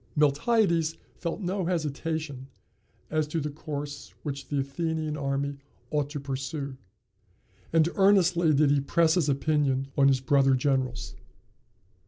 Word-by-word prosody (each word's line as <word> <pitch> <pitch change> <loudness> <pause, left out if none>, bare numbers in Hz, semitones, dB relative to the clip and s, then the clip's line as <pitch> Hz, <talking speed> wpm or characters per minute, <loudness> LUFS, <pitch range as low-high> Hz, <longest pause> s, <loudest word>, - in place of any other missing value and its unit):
Miltiades 165 - +2 0.2
felt 170 +4 -4
no 185 0 -1
hesitation, 155 -4 -3 0.6
as 155 -1 +1
to 160 +2 -2
the 150 0 -3
course 145 -1 -6
which 140 -2 -5
the 145 - -2
Athenian 155 +2 -2
army 140 0 -2 0.3
ought 150 -2 0
to 145 0 -5
pursue; 140 +1 -4 1.0
and 160 -1 +4
earnestly 180 -4 +4
did 145 0 +4
he 145 -1 +3
press 160 +3 +3
his 165 -5 +2
opinion 140 -1 +1
on 140 -1 +5
his 135 -1 +4
brother 135 0 +3
generals. 130 -3 -1
150 Hz, 130 wpm, -27 LUFS, 140-160 Hz, 1.0 s, on